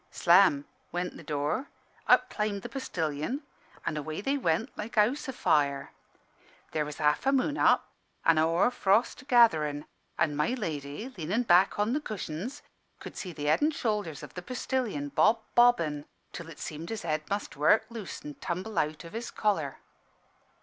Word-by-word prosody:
"Slam 170 -5 +4 0.3
went 180 +1 -3
the - - -10
door, 150 - -2 0.4
up - - +5
climbed 210 -2 -2
the - - -6
postillion, 170 - -3 0.4
an' 155 - -1
away 155 +1 -4
they 270 +8 0
went 225 - 0
like 220 +2 -7
a - - +8
house 265 +8 0
afire. 140 - +1 0.8
There 155 -1 0
was 150 0 -7
half 150 - +1
a - - +5
moon 275 +2 +1
up - - +4 0.4
an' 165 -1 +5
a - - +4
hoar 165 +9 +3
frost 235 +4 +1
gatherin', 155 - +4 0.3
an' 150 -3 +1
my 150 - +1
lady, 155 - -4
lean 165 -2 -5
in' 235 +4 +2
back 185 -3 +4
on 210 +3 +1
the 300 - 0
cushions, 215 - -5 0.4
could - - -9
see 185 - -5
the 150 -2 -6
head 150 - +3
and 300 +1 +2
shoulders 210 - -2
of - - -10
the 180 - -6
postillion 230 - -2
bob 220 +10 +3
bobbing, 165 -12 +4 0.3
till 170 -1 -7
it 155 - -11
seemed 160 +2 -6
his 225 -4 -4
head 155 -2 -1
must 200 +1 -3
work 155 +10 +4
loose 220 -6 -7
and 150 -1 -9
tumble 185 +2 -2
out 155 +2 -2
of 165 - -11
his 235 +2 -4
collar. 165 -10 -1
180 Hz, 175 wpm, -29 LUFS, 150-230 Hz, 0.8 s, a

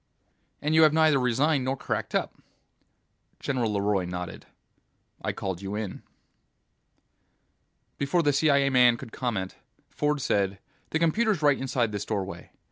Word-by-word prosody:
"And 150 +1 +1
you 160 - +6
have 155 -1 +6
neither 155 -3 +4
resigned 130 +3 +2
nor 130 +1 -1
cracked - - -3
up." - - 0 1.1
General 125 -6 -1
LeRoy 100 -2 +1
nodded. 90 -1 -6 0.7
"I - - -1
called 95 -2 -5
you 100 +1 -4
in." 105 -3 -5 2.0
Before 145 +5 +1
the 145 -1 +3
CIA 140 -1 +3
man 125 -2 +5
could 115 - -10
comment, 110 -8 -3 0.3
Ford 150 0 0
said, 100 -6 0 0.3
"The - - 0
computer's 170 +2 +1
right 145 -2 +4
inside 125 -4 0
this 105 -1 -4
doorway. 100 -3 -4
130 Hz, 135 wpm, -27 LUFS, 105-150 Hz, 2.0 s, you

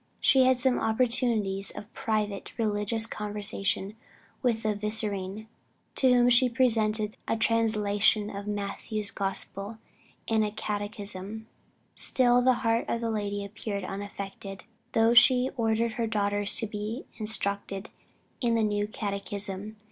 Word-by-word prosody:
She 265 -2 +5
had 255 -1 +3
some 255 0 +2
opportunities 220 -4 +1
of 210 +2 -9
private 210 -3 -3
religious 220 0 +1
conversation 205 -2 -2 0.5
with 230 -3 0
the 215 -1 +1
Vicereine, 210 -1 -2 0.5
to 260 -1 +3
whom 245 0 +5
she 245 +1 +5
presented 220 -4 +1
a 225 - 0
translation 215 -2 +2
of 200 +1 -6
Matthew's 205 +1 0
Gospel 195 +1 -2 0.5
and 220 -1 +2
a 210 - 0
catechism. 205 0 -5 0.5
Still 245 -1 +3
the 255 +1 +4
heart 230 +1 +2
of 235 - -1
the 230 -1 -1
lady 205 -2 -2
appeared 200 -1 -5
unaffected, 195 0 -7 0.3
though 225 +1 +4
she 250 +1 +6
ordered 230 -1 +1
her 230 +1 -2
daughters 205 -1 +1
to 225 - +3
be 215 +4 -5
instructed 200 -2 -1 0.5
in 235 -2 +2
the 225 - +2
new 205 -1 0
catechism. 200 0 -4
215 Hz, 130 wpm, -28 LUFS, 205-230 Hz, 0.5 s, she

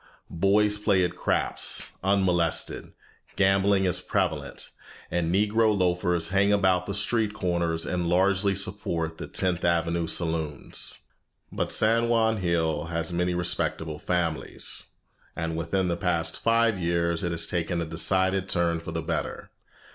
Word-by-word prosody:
Boys 105 +4 +2
play 100 -3 +2
at - - -4
craps - - +1
unmolested, 95 -4 0 0.4
gambling 95 0 +3
is 90 -1 +1
prevalent, 80 -8 -2 0.4
and 85 -1 0
Negro 105 +2 +2
loafers 90 -2 +1
hang 100 +1 +3
about 95 -3 +2
the 100 - -2
street 105 0 +1
corners 85 -4 -1
and 90 -1 -1
largely 95 +2 +2
support 85 -4 -2
the - - -6
Tenth 90 -2 -1
Avenue 85 -1 +1
saloons. 80 -5 -3 0.5
But - - -2
San 115 +2 +3
Juan 110 -1 +2
Hill 80 -4 0
has 85 +1 -3
many 90 +1 0
respectable 85 -3 -1
families, 85 -3 -2 0.5
and 80 -1 -3
within 85 +3 -1
the 85 - 0
past 85 -3 -1
five 115 -3 +2
years 85 -1 0
it 85 - 0
has 85 -1 -1
taken 85 0 -2
a 85 - -2
decided 95 +4 +1
turn 85 -2 +1
for 85 - -7
the 80 0 -3
better. - - -4
90 Hz, 140 wpm, -26 LUFS, 85-100 Hz, 0.5 s, gambling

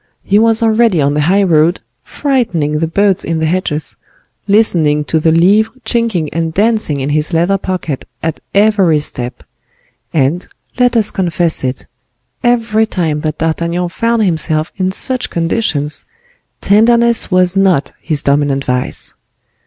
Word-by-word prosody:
He 200 +2 +2
was 225 +1 +3
already 225 -4 +2
on 140 0 +1
the 150 - 0
high 190 +6 +2
road, 170 -1 +2 0.2
frightening 180 - -1
the 165 - 0
birds 195 +2 +1
in 165 - -2
the 160 - -1
hedges, 155 -3 -2 0.5
listening 170 -8 +3
to 160 +2 -1
the 160 +1 +2
livres 195 +7 +3 0.2
chinking 230 -10 0
and 165 -1 -2
dancing 215 -8 +1
in 140 +2 -2
his 155 +3 -1
leather 175 +4 +1
pocket, 180 -7 -4 0.2
at 160 0 -2 0.2
every 200 -6 +3
step; 125 -4 -5 0.7
and, 155 +4 0 0.3
let 245 -1 +3
us 215 -2 +2
confess 175 -4 -1
it, 130 0 -3 0.6
every 225 -2 +1
time 160 -7 -2
that 155 0 -3
D'Artagnan 170 +2 -2
found 230 +4 0
himself 160 -3 0
in 185 -1 -1
such 255 +6 +1
conditions, 165 -4 -1 0.6
tenderness 235 +3 +3
was 185 -1 +2
not 190 -7 +1
his 155 -4 0
dominant 140 -1 0
vice. 125 0 -2
175 Hz, 145 wpm, -13 LUFS, 155-215 Hz, 0.7 s, was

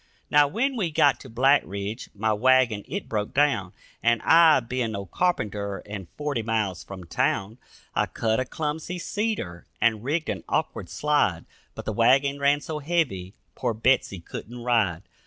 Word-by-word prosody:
Now, 145 0 +6
when 255 - 0
we 190 -7 0
got 145 -3 +3
to 130 - -11
Black 135 +5 +4
Ridge, 100 +5 -5
my 110 +1 +1
wagon 120 -2 +3
it 190 +10 -4
broke 105 -2 -3
down, 135 -11 +2 0.3
And 115 0 +3
I, 165 -2 +7
being 120 -2 -3
no 100 -1 -4
carpenter 105 - -1
and 100 -3 -7
forty 145 -5 -1
miles 110 -5 -1
from 95 -2 -9
town, 100 +6 -1 0.3
I - - +1
cut 110 0 0
a 130 - 0
clumsy 155 +5 -4
cedar 185 - -3
and 110 -2 +2
rigged 155 +5 -1
an - - -3
awkward - - -2
slide, 145 - +1 0.3
But - - -7
the 110 - -2
wagon 135 +5 +3
ran 140 +1 +3
so 155 +1 -5
heavy 140 - -1 0.2
poor 115 - -2
Betsy 115 -4 +2
couldn't 120 +7 -8
ride. 110 -9 +1
120 Hz, 165 wpm, -25 LUFS, 105-145 Hz, 0.3 s, I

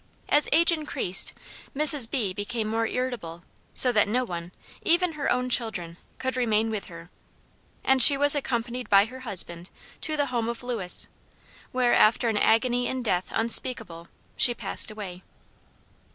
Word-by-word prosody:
As 295 0 +2
age 335 +3 +4
increased, 290 - 0 0.5
Mrs. 295 -5 +5
B. 215 -9 -2
became 215 +3 -4
more 225 +1 -2
irritable, 225 -11 -5 0.3
so 250 - +7
that 210 -3 +2
no 250 +4 -1
one, 175 -4 -8 0.3
even 345 +1 +1
her 300 -2 -3
own 250 0 -1
children, 220 -9 -3 0.2
could 260 -1 -4
remain 225 -3 0
with 215 -2 -5
her; 170 0 -13 0.7
and 265 0 +3
she 280 +3 +10
was 285 +1 +6
accompanied 245 -3 -3
by 200 0 +5
her 255 +3 -11
husband 185 -7 -3 0.3
to 310 -1 -2
the 290 - 0
home 235 -1 -2
of 235 +1 -7
Lewis, 225 -8 -2 0.6
where, 250 -1 +1
after 225 +2 +3
an 220 - -2
agony 245 +3 +1
in 260 -1 -4
death 185 -5 -2
unspeakable, 225 -7 -1 0.3
she 240 - +3
passed - - -1
away. 195 -4 -9
235 Hz, 155 wpm, -25 LUFS, 205-255 Hz, 0.7 s, she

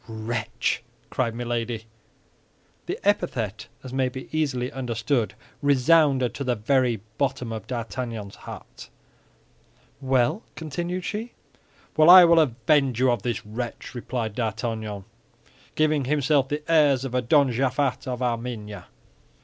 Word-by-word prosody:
"Wretch!" 115 +1 -2 0.3
cried 115 -3 -1
Milady. 120 -1 -3 1.0
The - - -2
epithet, 115 - 0 0.2
as 130 -1 -8
may 130 -1 +1
be 130 +4 -8
easily 130 -5 0
understood, 120 -1 -1 0.3
resounded 140 -2 +4
to 140 - -4
the 125 -2 0
very 120 0 +1 0.2
bottom 130 -4 -1
of 110 -3 -6
D'Artagnan's 115 -3 -5
heart. - - -11 1.1
"Well?" 135 - +2
continued 175 +4 -4
she. 225 +3 -4 0.6
"Well, 155 +1 +6
I 180 0 +11
will 170 -1 +6
avenge 130 -2 +2
you 130 -1 +4
of 120 -4 -1
this 120 -3 -3
wretch," 115 +3 -6
replied 120 -3 -3
D'Artagnan, 110 -3 -3 0.7
giving 155 -3 +2
himself 140 -1 +2
the 150 +1 -3
airs 145 -5 +4
of 135 - -4 0.2
Don 140 -4 +5
Japhet 130 +2 0
of 125 0 -3
Armenia. 115 -3 -4
125 Hz, 125 wpm, -25 LUFS, 115-145 Hz, 1.1 s, I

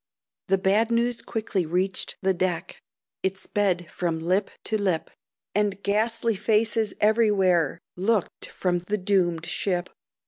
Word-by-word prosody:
The 195 - +3
bad 200 +4 +2
news 235 0 +1
quickly 215 -5 -2
reached 180 +4 -1
the 190 0 +3
deck, 180 -1 -2 0.4
It 190 0 -1
sped 185 -4 -1
from 170 -2 -1
lip 185 +5 +1
to 215 -1 -1
lip, 185 -5 0 0.4
And 200 -1 0
ghastly 225 +2 +1
Faces 220 +1 +1
everywhere 195 -8 +3 0.2
Looked 200 +1 0
from 180 -1 -1
the 200 +4 -2
doomed 180 -4 +1
ship. 180 -1 -1
195 Hz, 130 wpm, -25 LUFS, 180-215 Hz, 0.4 s, The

